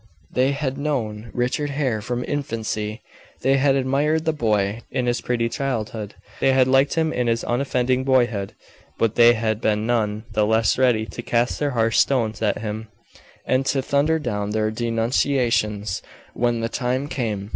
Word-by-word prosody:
They 130 +2 +2
had 140 -1 -3
known 115 -7 -2
Richard 125 +4 -1
Hare 135 -6 -1
from 120 +2 -3
infancy 110 -5 -3 0.4
they 135 +1 +3
had 135 0 +3
admired 145 +4 +1
the 160 - +1
boy 110 -5 0
in 125 - -1
his 120 0 0
pretty 120 -1 0
childhood 115 -4 -3 0.2
they 135 - +3
had 130 -1 +4
liked 135 +2 +3
him 160 -1 +1
in 125 -1 0
his 115 -1 +1
unoffending 125 0 0
boyhood, 120 -7 +1 0.4
but 115 -1 +1
they 120 0 +7
had 110 -1 -1
been 105 0 +1
none 110 -3 0
the 105 0 +1
less 110 +1 +2
ready 120 -4 +3
to 120 - -7
cast 120 0 0
their 145 - +1
harsh 115 0 +3
stones 115 -6 +1
at 105 -2 +1
him, 110 +1 -4 0.6
and 130 +1 +2
to 135 -1 +1
thunder 145 +4 +2
down 105 -8 -3
their 110 0 0
denunciations 115 -3 0 0.3
when 120 -1 0
the 115 - 0
time 130 +3 -1
came. 105 -8 -3
120 Hz, 165 wpm, -22 LUFS, 110-135 Hz, 0.6 s, they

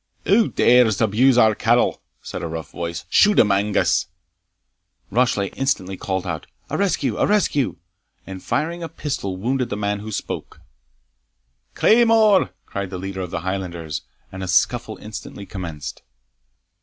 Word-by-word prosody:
"Who 215 +4 +4
dare 125 -1 +5
abuse 120 +4 +3
our 110 -3 +6
cattle?" - - +2 0.2
said - - -6
a - - -3
rough 80 0 -6
voice. 85 -1 -5
"Shoot 210 0 +4
him, 105 - +5
Angus!" 100 +1 +2 1.0
Rashleigh 110 -4 +1
instantly 115 -9 -1
called 95 0 -3
out 85 -4 -4 0.2
"A - - -1
rescue! 200 -2 0
a - - +2
rescue!" 195 - +1 0.5
and, 95 -1 -8
firing 170 +3 -2
a 165 - -5
pistol, 115 -12 -4
wounded 125 +4 -1
the 105 - -3
man 105 0 -1
who 110 +2 -7
spoke. - - -5 1.2
"Claymore!" 220 - +5 0.2
cried 100 -1 -4
the 95 - -5
leader 95 +1 -5
of 90 - -4
the 85 - -4
Highlanders, 85 -4 -4 0.3
and 95 - -7
a 95 - -4
scuffle 110 +4 +1
instantly 105 -1 -8
commenced. 85 -7 -7
105 Hz, 145 wpm, -22 LUFS, 95-135 Hz, 1.2 s, our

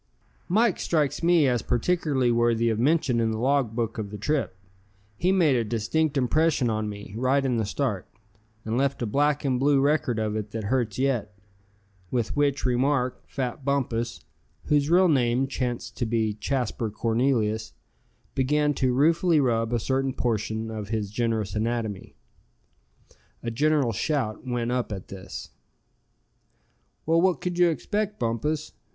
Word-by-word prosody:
"Mike 215 +2 +3
strikes 150 -4 0
me 170 -3 +4
as 120 -3 +1
particularly 130 0 +1
worthy 115 0 +2
of 110 -1 -1
mention 135 -2 +2
in 115 -1 +1
the 110 - -2
log 130 -2 +1
book 115 -2 -2
of 105 -2 -4
the 105 - -7
trip. 135 -3 -1 0.6
He 180 - +1
made 170 -8 +4
a 120 - +2
distinct 120 +8 0
impression 140 -1 +2
on 110 -1 -2
me, 100 -1 -9
right 130 +4 +1
in 125 -3 +1
the 110 -3 -1
start; 105 -5 -2 0.6
and 110 +3 0
left 135 -2 0
a - - +1
black 145 +6 +1
and 130 -2 +1
blue 140 +1 +3
record 140 -4 +1
of 110 -1 -1
it 105 -1 -3
that 110 -1 -3
hurts 115 0 -1
yet," 120 -6 -1 0.7
with 120 -1 -1
which 145 -2 +1
remark, 130 +1 +1
fat 130 0 -4
Bumpus 125 -4 -1 0.4
whose 145 0 +2
real 180 +2 +5
name 130 -4 +2
chanced 125 -3 -4
to 120 - -1
be 110 -2 0
Jasper 115 0 -2
Cornelius, 110 -1 0 0.6
began 150 +3 +2
to 130 -2 0
ruefully 165 +3 +3
rub 115 -4 +1
a 120 - +2
certain 135 +3 0
portion 110 -1 -2
of 105 -2 -6
his 105 -3 -2
generous 110 -3 -1
anatomy. 110 -2 -3 1.3
A 115 - -2
general 145 0 +2
shout 125 +1 -2
went 120 -1 -1
up 125 -2 -1
at 95 -3 -6
this. 95 -1 -8 1.5
"Well, 165 +1 +3
what 180 -4 +2
could 180 -1 -3
you 175 -1 +6
expect, 210 +6 -2
Bumpus?" 145 +7 -2
125 Hz, 155 wpm, -26 LUFS, 110-145 Hz, 1.5 s, you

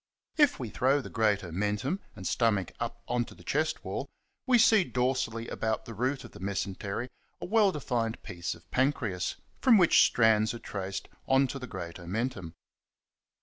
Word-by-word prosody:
If 295 -3 +4
we 120 -4 -4
throw 135 +3 +2
the 140 - -8
great 105 -3 +2
omen 100 +5 -1
tum 140 - -2 0.2
and 95 - -9
stomach 105 -1 +1
up - - -4
on 120 0 +1
to - - -13
the - - -16
chest 155 +2 -1
wall - - -4 0.4
we 250 -1 +6
see 220 -3 +6
dorsally 125 -5 -1
about 110 -1 -2
the 115 - -7
root 130 +5 -1
of - - -11
the - - -12
mesentery 100 +4 -3 0.3
a - - -5
well 210 0 +4
defined 120 -7 -2
piece 85 0 -4
of 85 0 -20
pancreas, 120 -9 0 0.2
from 250 -4 +6
which 175 -4 +6
strands 110 -1 +3
are - - -4
traced 100 -4 -5 0.2
on 135 +1 +4
to 135 - -5
the 125 - -7
great 85 -5 -7
omentum. 95 -2 -3
115 Hz, 180 wpm, -29 LUFS, 100-135 Hz, 0.4 s, we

